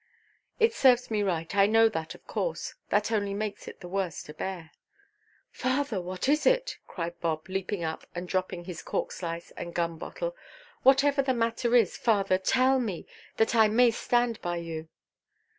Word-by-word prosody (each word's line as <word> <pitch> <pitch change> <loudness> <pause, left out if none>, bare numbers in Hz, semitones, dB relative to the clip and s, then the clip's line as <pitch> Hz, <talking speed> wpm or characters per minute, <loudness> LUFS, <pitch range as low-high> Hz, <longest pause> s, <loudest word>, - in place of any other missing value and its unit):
"It 455 0 +4
serves 250 - +4
me 210 -1 +1
right. 175 -2 -1
I 200 0 +6
know 225 +1 +5
that, 160 -6 -4
of - - -18
course. - - -3 0.2
That 210 +2 +1
only 200 -2 0
makes 210 0 -4
it - - -10
the 180 - -8
worse 185 -3 -2
to 150 - -10
bear." 170 -1 -5 0.8
"Father, 255 -5 -1
what 185 +5 -4
is 300 +2 +3
it?" - - +2
cried 170 -1 -5
Bob, 160 -2 -2
leaping 190 -1 -3
up, 160 0 -4
and 175 +1 -4
dropping 185 -1 -2
his 175 -2 -7
cork–slice 170 -1 -4
and 170 0 -7
gum–bottle; 170 - -3 0.5
"whatever 275 +1 +5
the 265 -1 0
matter 230 +1 +1
is, 225 -7 +4
father, 195 -5 +2
tell 260 +6 +3
me, 205 -9 -3 0.3
that 225 +2 +2
I 220 -2 +6
may 235 +3 +5
stand 240 0 0
by 175 0 -2
you." 165 -1 -6
200 Hz, 170 wpm, -28 LUFS, 175-245 Hz, 0.8 s, I